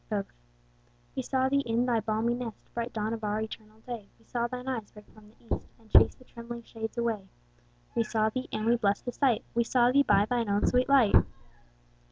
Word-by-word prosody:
Both. 205 -3 -2 0.8
We 260 - -1
saw 260 +1 +1
thee 280 +1 +2
in 240 -2 +1
thy 240 -2 +2
balmy 220 +2 0
nest, 240 -2 -7
Bright 235 0 -3
dawn 220 0 -2
of 225 -1 -5
our 210 0 0
eternal 220 0 -8
day; 230 -4 -7
We 225 - -27
saw 235 -1 -1
thine 250 +1 -6
eyes 235 -5 -3
break 210 -1 -15
from 215 -1 -17
the 230 +1 -4
east, - - -11
And 225 -1 -23
chase - - +7
the - - -18
trembling 235 -1 -9
shades 225 0 -6
away: 225 -5 -1 0.7
We 235 - +2
saw 220 -1 +1
thee 255 +3 -4
(and 215 0 -2
we 235 +1 +4
blest 205 -3 0
the 245 - -2
sight) 245 -4 +2
We 235 - +2
saw 245 +1 +3
thee 280 +2 +5
by 205 -6 +4
thine 235 -1 -1
own 200 +1 +2
sweet 250 +2 +2
light. 260 -7 +5
230 Hz, 220 wpm, -29 LUFS, 215-245 Hz, 0.8 s, chase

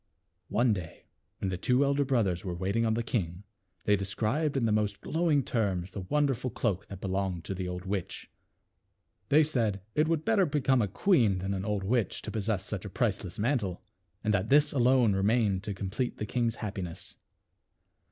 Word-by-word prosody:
One 120 0 +3
day 90 -5 -7 0.3
when 95 - -2
the 90 - -3
two 125 +7 +3
elder 140 +1 +2
brothers 110 -10 +1
were 90 -2 -3
waiting 100 +6 0
on 110 - +1
the 115 - -1
king, 90 -5 -2 0.4
they 105 - +4
described 110 +10 -1
in 125 - +1
the 110 - +2
most 105 -1 0
glowing 160 -4 +1
terms 95 -7 -1
the 100 - -5
wonderful 135 +4 0
cloak 105 -4 -2
that 95 - -8
belonged 95 -3 -2
to 95 - -4
the 95 -1 -4
old 90 +1 -5
witch. 95 -2 -4 1.0
They 155 +2 +6
said, 115 -10 0
it 155 +1 +2
would 160 -1 0
better 205 -5 +3
be 150 0 0
come 130 -1 +3
a 105 - +1
queen 115 - +3
than 95 +2 -2
an 95 0 -3
old 105 -2 -1
witch, 115 +2 0
to - - -5
possess 105 -3 -1
such 100 -3 -4
a 105 - -6
priceless 100 -5 -1
mantle, 105 -6 -1 0.4
and 105 - +1
that 100 +1 0
this 145 +1 +5
alone 125 -4 +4
remained 100 0 +2
to 105 - -2
complete 105 +6 -3
the 105 - -3
king's 115 +1 0
happiness. 95 -6 -6
105 Hz, 190 wpm, -29 LUFS, 95-130 Hz, 1.0 s, They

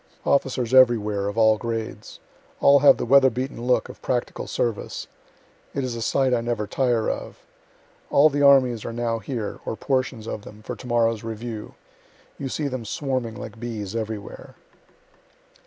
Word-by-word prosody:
Officers 130 -3 +1
everywhere, 105 -6 +4
of 100 +2 -4
all 110 -1 +4
grades. 115 -2 -5 0.4
All 140 0 +6
have 140 - +7
the - - -3
weatherbeaten 130 0 +3
look 125 0 +2
of - - -12
practical 125 -1 -2
service. 115 -3 -2 0.7
It 140 - -1
is 125 -2 -3
a 115 - -5
sight 130 +2 +1
I 120 - +2
never 115 -2 -2
tire 120 -1 0
of. - - -4 0.7
All 145 +2 +6
the 145 -1 -1
armies 130 -5 +5
are 115 - -5
now 115 -1 -1
here 115 -3 -5
(or - - -4
portions 130 -5 -1
of 110 - -4
them,) 105 +1 -13
for - - -5
to 125 - -11
morrow's 115 -2 +1
review. 115 -1 -6 0.6
You 135 - -3
see 150 +2 -2
them 130 -3 -4
swarming 125 -1 -3
like 110 +1 -9
bees 110 -3 -5
everywhere. 110 -2 -6
120 Hz, 160 wpm, -24 LUFS, 110-130 Hz, 0.7 s, have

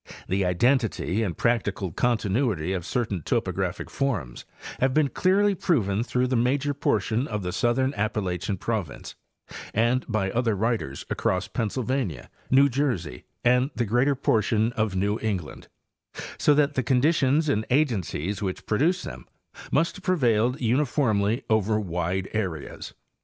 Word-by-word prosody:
The 95 +1 0
identity 110 +1 +1
and 95 -7 -2
practical 100 -6 0
continuity 110 - 0
of 90 -1 -4
certain 110 -8 -1
topographic - - -2
forms 105 - -2 0.3
have 130 0 +1
been 150 -2 +3
clearly 200 +5 +2
proven 115 - +1
through 125 +1 0
the 130 0 0
major 135 +4 +1
portion 115 -1 0
of 105 -3 -3
the 90 - -2
southern 120 +8 +1
Appalachian 100 -2 -2
province, 100 -8 -4 0.6
and 120 +4 +2
by 100 -4 0
other 115 -1 +1
writers 105 - -2
across 95 +1 0
Pennsylvania, 125 - -2 0.2
New 135 +2 +6
Jersey 120 - -2 0.2
and 125 +2 +3
the 120 - 0
greater 125 +6 +2
por 115 -4 +2
tion 110 +3 +1
of 110 -4 -1
New 100 +3 0
England, 95 -9 -4 0.7
so 150 - +4
that 145 0 +2
the 130 - +1
conditions 140 +4 +2
and 110 -7 +1
agencies 105 - 0
which 95 -2 -4
produced 165 - +1
them 60 -1 -8 0.4
ane - - +2
have 190 - -9
prevailed 125 -9 +2
uniformly 120 -3 +1
over 110 -1 +2
wide 90 0 -2
areas. 90 -9 -4
115 Hz, 140 wpm, -25 LUFS, 95-130 Hz, 0.7 s, New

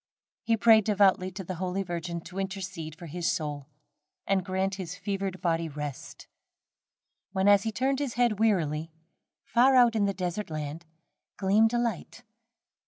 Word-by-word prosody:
He 230 0 +1
prayed 220 -1 +6
devoutly 195 -3 +3
to 190 0 -6
the 185 - -5
Holy 185 +1 -1
Virgin 170 -1 -4
to 180 +3 -8
intercede 190 -5 -5
for 170 - -10
his 170 +2 -1
soul, 145 -3 -4 0.6
and 195 -1 +1
grant 190 +1 -1
his 180 -1 -6
fevered 195 -1 -3
body 165 -1 0
rest; 145 -2 -7 1.1
when, 190 0 +1
as 205 -1 +6
he 225 - -2
turned 265 +4 0
his 280 -5 -3
head 240 -4 +2
wearily, 165 -7 +1 0.5
far 255 +3 +4
out 240 -2 +5
on 210 -2 +2
the 200 - 0
desert 185 +2 -3 0.9
gleamed 210 +4 +3
a - - +2
light. 235 0 -3
195 Hz, 155 wpm, -28 LUFS, 175-220 Hz, 1.1 s, prayed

